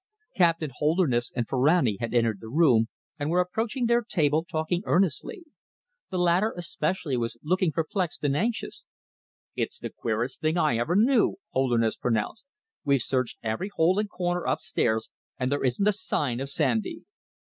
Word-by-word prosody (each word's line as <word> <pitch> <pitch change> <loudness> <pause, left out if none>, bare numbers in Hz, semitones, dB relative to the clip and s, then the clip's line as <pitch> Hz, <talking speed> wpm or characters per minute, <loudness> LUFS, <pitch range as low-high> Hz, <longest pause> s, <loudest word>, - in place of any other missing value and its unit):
Captain 165 -5 +2
Holderness 150 -5 +1
and 120 -3 -1
Ferrani 130 - +2
had 115 - -3
entered 115 -4 +1
the 110 - -9
room 125 -6 +4 0.3
and 145 +1 -1
were 175 +2 +2
approaching 225 +8 -1
their 235 +1 +3
table, 155 -8 +1
talking 170 0 -2
earnestly. 190 - 0 0.7
The 185 - -3
latter 180 +5 +3
especially 160 -3 -2
was 115 0 -3
looking 180 +1 +1
perplexed 175 +2 -2
and 140 -1 +1
anxious. 225 +8 -2 0.7
"It's - - -2
the - - -6
queerest - - -3
thing 155 +2 +1
I 155 -9 +2
ever 140 +9 0
knew," 230 +3 +4 0.2
Holderness 120 -4 +1
pronounced. 125 - -2 0.4
"We've 140 -1 +3
searched 130 0 -1
every 110 - -2
hole 180 +5 +3
and 210 -1 -1
corner 175 -2 -2
upstairs, 110 -1 0 0.3
and 125 +1 -1
there 145 - 0
isn't 135 +11 +1
a 210 - +4
sign 145 - -1
of 135 +1 -3
Sandy." 130 -7 0
155 Hz, 155 wpm, -26 LUFS, 125-185 Hz, 0.7 s, room